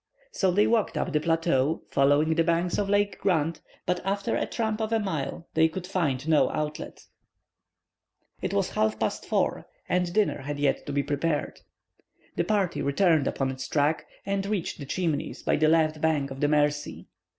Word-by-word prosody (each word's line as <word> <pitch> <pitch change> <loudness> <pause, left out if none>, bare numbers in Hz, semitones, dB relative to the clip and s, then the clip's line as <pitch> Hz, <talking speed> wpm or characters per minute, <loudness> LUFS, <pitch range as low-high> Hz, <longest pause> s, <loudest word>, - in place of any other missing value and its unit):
So 190 - +1
they 205 +4 +3
walked 225 -2 +1
up 175 - -2
the 150 - +3
plateau, 165 -2 +1
following 145 +3 +3
the 165 +1 +2
banks 170 +1 +1
of 200 -1 -1
Lake 205 0 +1
Grant, 165 -3 0 0.2
but 180 0 -1
after 200 +1 -1
a - - -1
tramp 220 -1 -2
of 220 0 -2
a 225 - +2
mile, 170 -5 -3
they 160 0 +4
could 180 +2 -6
find 155 -7 -1
no 155 -2 +4
outlet. 150 0 -5 1.4
It - - -2
was - - 0
now - - 0
half 110 0 +1
past - - -2
4, - - 0 0.2
and 180 -1 0
dinner 210 -5 +1
had 145 +2 -4
yet 145 0 0
to - - -3
be 140 0 0
prepared. 150 +2 -2 0.8
The - - +1
party 200 -5 0
returned 155 0 +2
upon 135 -1 -1
its 130 0 -6
track, 150 +1 +1 0.2
and 195 0 -1
reached 200 -6 -2
the 140 - -7
Chimneys 160 -2 -2
by - - +2
the 155 +1 +3
left 155 -1 +2
bank 150 -4 +1
of 135 - -7
the 145 - +2
Mercy. 145 0 0
160 Hz, 185 wpm, -27 LUFS, 145-185 Hz, 1.4 s, they